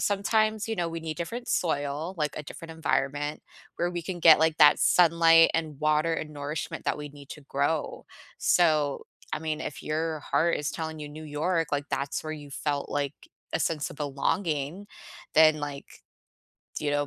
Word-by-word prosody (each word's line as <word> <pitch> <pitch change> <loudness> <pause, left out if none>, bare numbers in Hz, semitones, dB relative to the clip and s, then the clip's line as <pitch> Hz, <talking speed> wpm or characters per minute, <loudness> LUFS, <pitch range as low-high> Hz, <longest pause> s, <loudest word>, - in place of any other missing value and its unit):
sometimes, 215 +1 +1
you 225 - -1
know, 175 -2 -1
we 165 0 -5
need 160 -1 -5
different 235 +9 -5
soil, 150 +2 -1
like, 150 -3 -2
a 150 - -4
different 165 +2 -9
environment 145 -2 -1 0.3
where 175 +1 0
we 175 -1 -4
can 175 +1 -5
get, 160 -2 +8
like, 160 0 +2
that 150 0 +7
sunlight 165 -1 +6
and 155 -4 -2
water 155 +2 +2
and 155 -1 -4
nourishment 150 +1 -5
that - - +1
we 150 - -6
need 145 -1 -14
to 150 - -9
grow. 145 +3 -2 0.3
So, 155 -5 +2 0.3
I 155 - 0
mean, 155 -1 -3
if 150 - -6
your 155 +1 -2
heart 170 +3 +1
is 150 0 -2
telling 160 -1 -5
you 150 - -6
New 155 +2 -9
York, 160 +2 -1
like, 145 0 -1
that's 140 +2 -2
where 155 - -3
you 145 -2 -9
felt, 145 0 -2
like, 145 0 -2 0.4
a - - 0
sense 155 -3 -1
of - - -10
belonging, 150 +4 -2 0.5
then, 155 -1 +6
like, 145 -1 -5 0.9
you 150 - -1
know, 145 0 +1
155 Hz, 185 wpm, -27 LUFS, 145-165 Hz, 0.9 s, get